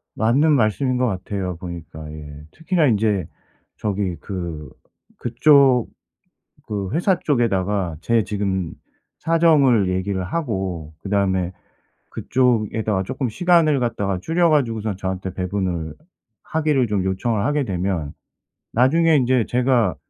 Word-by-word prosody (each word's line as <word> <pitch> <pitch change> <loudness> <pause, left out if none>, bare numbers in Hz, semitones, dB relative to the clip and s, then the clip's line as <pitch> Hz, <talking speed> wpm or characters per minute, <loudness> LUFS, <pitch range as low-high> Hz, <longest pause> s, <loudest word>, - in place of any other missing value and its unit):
맞는 130 +9 +3
말씀인 125 +1 +1
것 125 0 +1
같아요, 95 -2 -3
보니까. 85 -3 -8
예. 75 -1 -10
특히나 165 -1 +1
인제 105 -6 +1 0.5
저기 100 -3 -2
그 85 -6 -6 0.5
그쪽 130 0 +4 0.8
그 100 -3 -3
회사 180 +2 +2
쪽에다가 100 - 0
제 115 +3 +1
지금 95 -4 -2 0.5
사정을 150 - +3
얘기를 95 +1 -1
하고 95 - -3
그다음에 95 -3 0 0.6
그쪽에다가 110 -5 0
조금 130 +6 -3
시간을 160 +1 +3
갖다가 100 -6 -1
줄여 170 - +2
가지고선 115 -9 0
저한테 95 -1 -4
배분을 90 -4 -3 0.5
하기를 150 -5 +1
좀 100 -3 0
요청을 100 +3 -1
하게 145 -1 +1
되면 90 - -2 0.6
나중에 160 +7 +4
인제 125 -3 +2
제가 120 - +2
105 Hz, 265 characters per minute, -21 LUFS, 95-130 Hz, 0.8 s, 그쪽